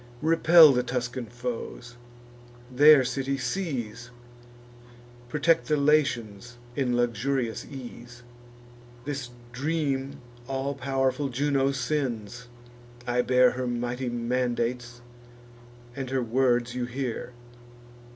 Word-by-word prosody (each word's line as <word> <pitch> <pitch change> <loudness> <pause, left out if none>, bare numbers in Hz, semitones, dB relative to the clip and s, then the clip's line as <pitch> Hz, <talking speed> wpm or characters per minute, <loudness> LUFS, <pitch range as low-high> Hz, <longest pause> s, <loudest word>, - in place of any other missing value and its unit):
Repel 165 -1 +7
the 125 -2 +2
Tuscan 125 -1 -4
foes; 120 0 -6 0.8
their 145 +2 +7
city 135 +2 -2
seize; 125 - -4 1.2
Protect 160 +4 +2
the 150 - +2
Latians 120 -7 0 0.2
in 125 -3 0
luxurious 120 0 -1
ease. 125 -2 -10 0.8
This 140 -4 -4 0.2
dream 140 0 -2 0.3
all 135 +1 -2
pow'rful 135 +1 -1
Juno 135 +1 +1
sends; 125 -5 -3 0.6
I 125 0 +1
bear 125 0 +4
Her 130 0 -4
mighty 120 +1 -3
mandates, 120 0 -2 0.9
and 135 -2 -5
her 130 -1 0
words 120 0 +1
you 125 -1 -2
hear. 125 -1 -5
125 Hz, 95 wpm, -26 LUFS, 120-140 Hz, 1.2 s, Repel